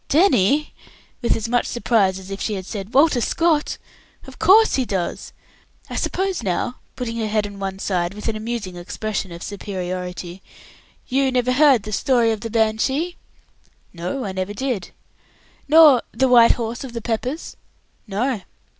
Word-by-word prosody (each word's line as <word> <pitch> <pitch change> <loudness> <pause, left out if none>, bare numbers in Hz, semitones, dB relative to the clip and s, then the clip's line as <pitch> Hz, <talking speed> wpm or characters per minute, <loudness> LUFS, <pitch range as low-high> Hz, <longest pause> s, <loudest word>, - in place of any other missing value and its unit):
"Danny!" 295 - +3 0.5
with 235 - +2
as 225 0 -3
much 245 +1 +1
surprise 215 -6 +1
as 190 +1 -10
if 195 - -5
she 210 -3 -2
said 195 +1 -6
"Walter 280 -3 +5
Scott!" 325 +2 +1 0.5
"Of - - -13
course 440 +4 +6
he 265 - +2
does. 190 -7 -3 0.6
I - - -4
suppose 380 -3 -1
now," 190 +4 -2 0.2
putting 235 -2 -4
her 220 -1 -1
head 210 0 0
on 200 -1 -9
one 195 -1 -4
side, 180 -1 -1
with 210 - -6
an 225 - -1
amusing 215 -4 -4
expression 195 +2 -4
of 170 +1 -8
superiority, 180 -2 -5 0.7
"you 265 0 +1
never 250 0 +1
heard 265 -4 +5
the 215 - -7
story 235 +2 +2
of 220 -2 -3
the 230 - -4
'Banshee'?" 235 +10 0 0.8
"No, 180 +9 -4
I 195 - -3
never 190 +2 -4
did." 240 -6 -3 0.8
"Nor 300 -4 +7
the 265 +4 +1
'White 240 -2 +7
Horse 235 +1 -4
of 260 -3 -8
the 230 - -4
Peppers'?" 245 +7 -3 0.5
"No." 215 +3 -1
225 Hz, 160 wpm, -21 LUFS, 195-260 Hz, 0.8 s, Nor